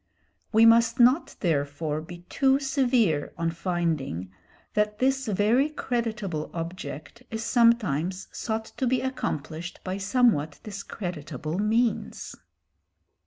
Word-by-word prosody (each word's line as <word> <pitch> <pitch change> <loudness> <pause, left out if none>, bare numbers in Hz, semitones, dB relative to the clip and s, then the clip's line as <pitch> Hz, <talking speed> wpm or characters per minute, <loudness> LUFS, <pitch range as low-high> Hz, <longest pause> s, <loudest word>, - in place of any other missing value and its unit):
We 225 +1 +6
must 230 +2 +5
not 250 +7 +4
therefore 150 -2 -1
be 175 +2 -10
too 270 0 +3
severe 250 - +1
on 165 0 0
finding 165 - -2 0.4
that 210 0 +1
this 265 +1 +1
very 220 +8 +3
creditable 220 - -3
object 165 - -6
is 225 -1 -4
sometimes 195 - +2
sought 220 -1 -3
to 260 - 0
be 255 +1 +2
accomplished 170 - -4
by 185 +1 -3
somewhat 200 - +2
discreditable 175 - -5
means. 225 +3 0
205 Hz, 110 wpm, -26 LUFS, 160-235 Hz, 0.4 s, We